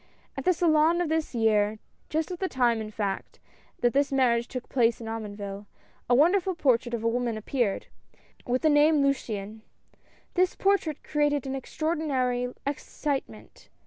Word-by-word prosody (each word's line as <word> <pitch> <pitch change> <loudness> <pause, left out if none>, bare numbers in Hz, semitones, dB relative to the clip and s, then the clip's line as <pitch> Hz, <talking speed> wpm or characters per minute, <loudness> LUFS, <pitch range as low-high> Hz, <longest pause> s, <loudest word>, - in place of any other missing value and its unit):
At - - -5
the 365 - +5
Salon 325 0 +3
of 350 -3 0
this 320 -4 -1
year, 215 -2 +2 0.3
just 315 +3 -1
at 355 - -5
the 380 - -1
time 240 -3 +2
in 215 - -5
fact, 205 -2 -4 0.4
that 240 -1 +3
this 280 +1 +2
marriage 240 -3 +2
took 255 -1 -6
place 235 -3 +2
at 230 - -8
Omonville, 205 -2 -6 0.4
a 245 - +5
wonder 340 +9 +5
ful 375 0 -3
portrait 245 -6 +1
of 225 - -5
a - - +2
woman 235 -1 0
appeared, 220 -2 -1 0.6
with 250 +4 0
thq 310 - +5
name 295 0 +5
Luciane. 220 -6 -2 0.7
This 365 0 +2
portrait 390 -7 +1
created 295 -2 0
an 265 - -3
extraordinary 265 -4 -1
ex 280 0 -3
citement. 285 -3 -5
260 Hz, 165 wpm, -27 LUFS, 230-310 Hz, 0.7 s, the